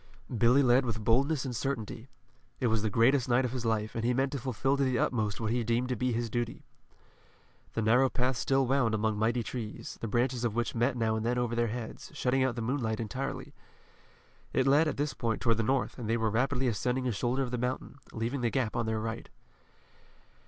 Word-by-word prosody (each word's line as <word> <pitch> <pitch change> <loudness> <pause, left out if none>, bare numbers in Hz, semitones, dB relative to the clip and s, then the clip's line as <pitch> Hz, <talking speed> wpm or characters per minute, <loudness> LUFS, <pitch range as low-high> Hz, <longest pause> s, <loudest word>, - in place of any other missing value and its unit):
Billy 120 +5 +5
led 125 +1 +5
with 110 -3 -3
boldness 135 +6 +2
and 125 -2 -3
certainty. 120 0 -4 0.5
It 130 - -1
was 110 - +1
the 110 - 0
greatest 120 +5 +3
night 125 +2 +3
of 125 - -2
his 125 -2 -4
life, 110 -1 0
and 115 - -3
he 125 +1 +2
meant 135 +1 +1
to 140 - -3
fulfill 130 +2 0
to 140 - +2
the 130 -2 +1
utmost 110 -5 0
what 110 -1 -1
he 120 0 +1
deemed 120 +2 0
to 125 - 0
be 125 +2 0
his 120 0 -1
duty. 120 +1 -3 1.1
The 115 - -1
narrow 125 +5 +4
path 125 0 0
still 135 +2 +2
wound 125 -4 +2
among 110 -1 0
mighty 115 +2 +1
trees, 110 -1 -6
the 115 - -2
branches 120 +2 0
of 115 -3 0
which 120 0 -1
met 120 +2 +1
now 110 -1 +1
and 110 - -2
then 120 +2 0
over 120 -1 0
their 120 0 +2
heads, 115 0 -6
shutting 130 +1 +1
out 130 -2 0
the 115 - -3
moonlight 115 -3 -1
entirely. 130 +5 -4 1.0
It 130 - +2
led 145 +4 +5
at 155 - -2
this 145 -2 -1
point 115 -1 -1
toward 115 -3 +2
the - - +1
north 130 +3 0
and 115 -3 -4
they 115 - +2
were 110 -1 0
rapidly 130 +3 +1
ascending 125 +3 0
a - - +1
shoulder 125 +5 0
of 125 - -4
the 125 - -2
mountain, 125 +2 -3
leaving 120 +4 -2
the 120 - +2
Gap 125 -3 -1
on 120 -1 -1
their 110 0 0
right. 115 +1 -5
120 Hz, 225 wpm, -30 LUFS, 115-130 Hz, 1.1 s, Billy